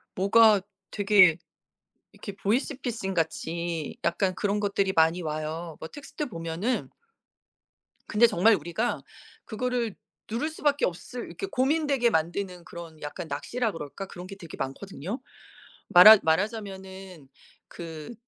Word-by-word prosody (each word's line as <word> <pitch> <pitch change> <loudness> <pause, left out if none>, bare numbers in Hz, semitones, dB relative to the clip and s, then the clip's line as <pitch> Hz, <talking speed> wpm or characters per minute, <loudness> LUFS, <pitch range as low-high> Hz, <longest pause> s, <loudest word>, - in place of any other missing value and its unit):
뭐가 205 +1 +5 0.3
되게 195 -5 +5 0.8
이렇게 200 - -8
보이스피싱같이 190 - -2
약간 185 +2 +1
그런 205 +1 -1
것들이 200 -1 0
많이 165 +1 +3
와요. 155 +1 -4
뭐 160 - -7
텍스트 290 - -6
보면은 170 +3 -3 1.2
근데 220 +3 +5
정말 220 +1 +4
우리가 175 +9 -2 0.4
그거를 240 -1 -2 0.4
누를 240 +8 -1
수밖에 290 -2 0
없을 210 +7 -6
이렇게 390 - -6
고민되게 280 -4 +1
만드는 175 +1 -2
그런 170 -3 -10
약간 150 +3 -6
낚시라 225 - -2
그럴까? 165 +5 -7
그런 180 -1 -10
게 195 - -8
되게 170 -4 -10
많거든요. 190 - -5 0.7
말하 210 +5 +10
말하자면은 190 - -3 0.4
그 165 +3 -8
190 Hz, 280 characters per minute, -27 LUFS, 165-225 Hz, 1.2 s, 말하